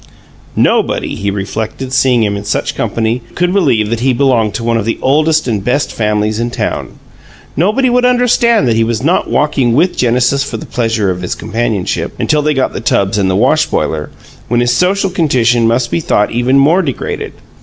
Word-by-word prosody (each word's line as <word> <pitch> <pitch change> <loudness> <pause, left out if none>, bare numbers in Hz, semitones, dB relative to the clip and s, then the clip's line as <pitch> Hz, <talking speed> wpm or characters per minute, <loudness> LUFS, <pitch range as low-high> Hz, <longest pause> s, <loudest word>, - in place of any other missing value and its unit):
Nobody, - - +1
he 100 - -3
reflected, 110 +6 -4
seeing 130 -3 +3
him 100 -1 0
in 100 - -5
such 105 - -2
company, 115 +2 -2
could 180 +1 0
believe 125 - +1
that 115 - -1
he 130 +2 +1
belonged 120 -5 +1
to 115 - -3
"one 115 0 +1
of 110 - -2
the 115 - -1
oldest 155 +2 +1
and 105 -5 -1
best 135 +6 0
families 105 0 -1
in 120 +1 -1
town." - - -4 0.6
Nobody 215 - +1
would 250 0 +2
understand 240 - +3
that 115 - +2
he 115 - +2
was 115 +2 -2
not 170 +5 +1
walking 135 -5 +1
with 175 +6 +2
Genesis 125 +3 +1
for 130 -5 -5
the - - -8
pleasure 115 -5 -1
of 90 0 -5
his 90 - -3
companionship 110 -4 -3
until 150 -1 +1
they 150 0 0
got 130 - 0
the - - -5
tubs 100 -3 0
and 95 -1 +1
the 95 - 0
wash 135 +9 +2
boiler, 75 -1 -2 0.4
when 120 +1 +1
his 120 0 +2
social 195 +3 +1
condition 120 -9 +2
must 115 +1 0
be - - 0
thought 105 -9 0
even 120 +3 +1
more 155 +7 +4
degraded. 140 -8 -4
120 Hz, 195 wpm, -13 LUFS, 110-150 Hz, 0.6 s, more